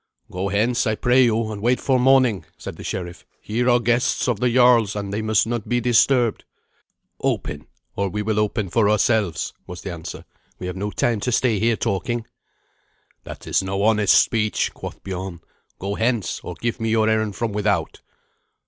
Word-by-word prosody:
"Go 95 +2 -2
hence, 115 +5 +1
I 110 - +1
pray 125 +4 +4
you, 115 -1 0
and 105 -1 -6
wait 125 +3 +2
for 130 -2 +1
morning," 125 -7 +4
said - - -8
the - - -10
sheriff. 90 -2 -5 0.2
"Here 120 +4 -1
are 120 0 +5
guests 120 +1 +1
of 120 -5 0
the 125 +1 +2
jarl's, 120 -4 +4
and 100 -1 -4
they 105 - -1
must 110 -2 +2
not 115 -2 -4
be 120 0 +2
disturbed." 120 0 +2 0.8
"Open, - - -2 0.3
or 100 -1 -1
we 105 +3 -3
will 105 0 0
open 105 -2 -1
for 110 -3 +3
ourselves," 105 -5 +1
was 90 0 -8
the 95 - -5
answer. 80 -2 -8 0.3
"We 90 - -7
have 90 0 -4
no 100 +2 -3
time 115 +1 0
to 125 - -2
stay 115 -3 +2
here 115 +1 +2
talking." 115 +4 -2 1.0
"That - - -9
is - - +1
no 95 +1 -2
honest 105 -2 +4
speech," 105 -2 0
quoth - - -9
Biorn. 95 -2 -6 0.4
"Go 100 +1 -4
hence, 115 -2 -1
or - - -7
give 120 0 -3
me 115 0 -1
your 110 -1 +2
errand 110 -2 0
from 115 0 -2
without." 105 0 -1
110 Hz, 185 wpm, -22 LUFS, 100-120 Hz, 1.0 s, are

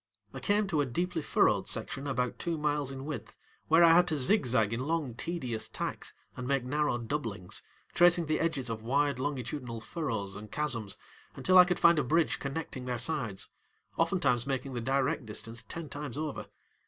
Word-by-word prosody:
I 135 - -6
came 205 +10 +2
to 155 -5 +2
a - - +1
deeply 170 +6 -1
furrowed - - +2
section 140 +1 -4
about 125 -2 -1
two 170 -1 -1
miles 150 -2 0
in 135 0 -7
width 150 -1 -6 0.3
where 165 +2 +6
I 165 -1 +8
had 175 +1 +5
to 155 -3 +1
zigzag 125 - +3
in 115 - -2
long, 160 -6 -1
tedious 125 -4 -3
tacks - - -5 0.2
and 125 -1 -5
make 135 -2 +1
narrow 145 0 0
doublings, 115 -7 -4 0.3
tracing 175 -1 +5
the 155 0 0
edges 150 -6 0
of 115 -2 -3
wide 140 +3 +1
longitudinal 130 -3 -3
furrows 110 - -3
and 105 +1 -9
chasms 120 -10 -1 0.4
until 185 0 +5
I 180 - +10
could 180 0 0
find 170 -2 +6
a - - +2
bridge 160 +5 +2
connecting 135 -2 -4
their 125 -1 -2
sides, 120 -6 0 0.5
oftentimes 140 -8 +1
making 135 0 -2
the 120 - -3
direct 135 +1 0
distance 115 +2 -3
ten 165 -1 -7
times 145 -3 -6
over. 155 -2 -4
140 Hz, 180 wpm, -30 LUFS, 120-160 Hz, 0.5 s, I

